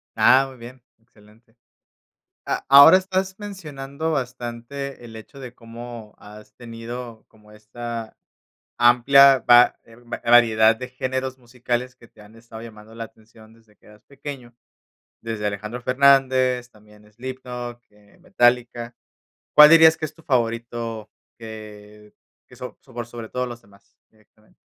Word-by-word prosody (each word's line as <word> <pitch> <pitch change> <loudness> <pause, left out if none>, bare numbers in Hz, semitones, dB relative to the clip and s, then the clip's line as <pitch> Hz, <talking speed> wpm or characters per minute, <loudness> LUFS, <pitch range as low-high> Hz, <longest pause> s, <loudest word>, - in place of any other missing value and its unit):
Ah, 135 +1 +4
muy 130 - -15
bien, 120 +2 -13 0.2
excelente. 115 0 -25 0.9
A - - -3
ahora 140 +6 +9
estás 190 0 -3
mencionando 160 -7 -6
bastante 125 0 -6
el 115 -1 -12
hecho 110 +5 -13
de 125 -2 -10
cómo 115 -2 -11
has 105 +1 -15
tenido 115 0 -9
como 105 -1 -23
esta 115 +2 -8 0.6
amplia 135 +3 +6
va 120 0 +5
eh, 115 - -19
va 120 0 -9
variedad 115 -2 +5
de 125 +2 -8
géneros 130 +1 -4
musicales 125 0 -5
que 115 - -19
te 105 - -19
han 105 +1 -18
estado 115 -1 -13
llamando 110 -1 -13
la 115 0 -6
atención 110 0 -19
desde 110 -2 -26
que - - -27
eras 105 0 -19
pequeño, 135 -4 -10 0.7
desde 110 -2 -4
Alejandro 105 +4 -6
Fernández, 130 -1 +2
también 105 -1 -21
Slipknot, 125 0 -8
eh, 105 -1 -25
Metallica, 120 -8 0 0.6
¿cuál 150 0 +9
dirías 160 -1 +7
que - - -6
es 155 - -14
tu 165 - -20
favorito?, 115 -4 -3 0.3
que 105 -1 -12 0.3
que - - -18
so - - -10
por 120 -1 -9
sobre 120 -1 -10
todo 125 +2 -3
los 120 -1 -9
demás. 100 -1 -26
Directamente. 110 0 -30
120 Hz, 140 wpm, -22 LUFS, 110-130 Hz, 0.9 s, ahora